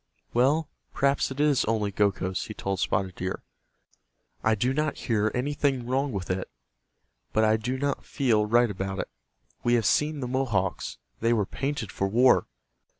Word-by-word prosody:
"Well, 145 +6 +3 0.3
perhaps 140 0 +2
it 135 +1 -7
is 145 -3 +3
only 105 -2 0
Gokhos," 95 -2 0
he 110 - -7
told 95 -1 -2
Spotted 95 0 0
Deer, 95 +1 -4 1.0
"I 110 0 +3
do 125 +5 +1
not 150 +1 -1
hear 110 -3 0
anything 140 -1 0
wrong 135 +3 0
with 95 -4 -3
it, 95 0 -3 0.8
but 110 - +3
I 110 0 +4
do 120 +4 -2
not 140 +1 -1
feel 115 -7 +1
right 120 0 +4
about 95 0 -4
it. - - -3 0.5
We 120 0 +3
have 115 -2 +1
seen 150 +5 +2
the 125 - -3
Mohawks. 115 -8 -1 0.2
They 115 +1 +2
were 105 -4 +2
painted 135 -2 -3
for 95 - -1
war. 125 +5 +4
120 Hz, 165 wpm, -27 LUFS, 100-135 Hz, 1.0 s, I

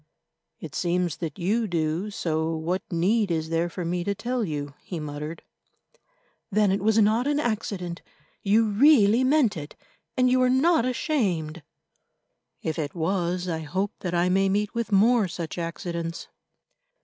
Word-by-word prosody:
"It 155 -4 -8
seems 175 0 0
that 160 -4 -5
you 215 +5 0
do, 170 +2 -1
so 160 -4 -1
what 170 +4 -2
need 195 +5 +2
is 160 -1 -1
there 165 +1 0
for 175 0 -5
me 175 +1 -1
to 200 +2 -1
tell 245 +3 -2
you?" 145 -5 -4
he 175 - -6
muttered. 150 +2 -6 1.1
"Then 205 -1 +3
it 195 +1 0
was 220 +2 +2
not 220 +4 +3
an 290 0 +1
accident; 200 - -3 0.4
you 215 +3 +3
really 230 0 +5
meant 260 -4 +3
it, 150 -2 -7 0.4
and 255 0 +4
you 255 0 +3
are 255 - +4
not 270 +1 +3
ashamed." 190 - -1 1.0
"If 160 0 -2
it 150 +1 -3
was, 175 +1 -1
I 165 -2 -2
hope 185 +6 -2
that 175 -2 -3
I 175 +1 +2
may 195 +1 +2
meet 205 +1 0
with 230 -2 -3
more 215 +2 +4
such 170 0 -5
accidents." 170 0 -4
185 Hz, 160 wpm, -25 LUFS, 165-220 Hz, 1.1 s, really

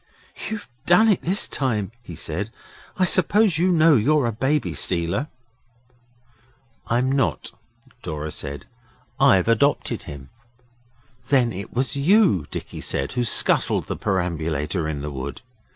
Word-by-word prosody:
'You've 210 -2 -6 0.2
done 200 +6 +5
it 200 - +2
this 185 +4 +1
time,' 110 -8 -2
he 90 -8 -10
said. 85 +6 -3 0.5
'I 185 - +3
suppose 185 0 +3
you 180 - +3
know 165 -3 +5
you're 140 +4 +2
a 115 - 0
baby 135 +7 -1
stealer?' 90 - 0 1.6
'I'm 125 +3 +1
not,' 135 -2 -1 0.5
Dora 75 0 -5
said. 70 -1 -7 0.5
'I've 95 0 +4
adopted 115 +6 +1
him.' 70 -2 -10 1.0
'Then 125 -5 +2
it 95 +2 -7
was 130 +3 -1
you,' 155 - +3
Dicky - - -7
said, 70 +1 -2
'who 125 -1 -1
scuttled 120 - +3
the - - -4
perambulator 80 -3 -2
in 75 -2 -4
the 75 +1 -5
wood? 70 +1 -6
115 Hz, 135 wpm, -22 LUFS, -, 1.6 s, done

